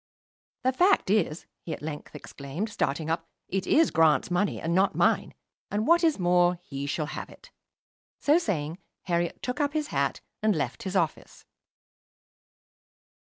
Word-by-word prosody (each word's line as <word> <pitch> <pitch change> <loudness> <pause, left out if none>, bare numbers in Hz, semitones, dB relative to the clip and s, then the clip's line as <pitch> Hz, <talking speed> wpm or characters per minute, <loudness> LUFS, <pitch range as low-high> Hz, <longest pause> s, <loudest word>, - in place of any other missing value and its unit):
"The 260 - +3
fact 355 - +3
is," 175 -6 +1 0.2
he 165 - -5
at - - -8
length 150 -1 -6
exclaimed, 145 +10 -5
starting 155 -4 -1
up, 165 0 -2 0.2
"it 195 0 -2
is 325 +1 +4
Grant's 160 -1 +3
money, 190 +3 +1
and 165 +1 -1
not 190 +2 +3
mine; - - +2 0.3
and 210 +2 -1
what 340 +3 +5
is 320 -3 +3
more, 175 -1 +3
he 140 -2 -5
shall 150 +2 -1
have - - -6
it." - - -16 0.7
So 300 +4 +4
saying, 165 - -2 0.2
Herriot 170 -1 -1
took 250 - -3
up 290 -1 +1
his 305 -1 -1
hat 140 0 -1 0.2
and 215 -2 +3
left 140 -5 -2
his 190 0 -4
office. 170 -4 -2
175 Hz, 160 wpm, -27 LUFS, 155-215 Hz, 0.7 s, what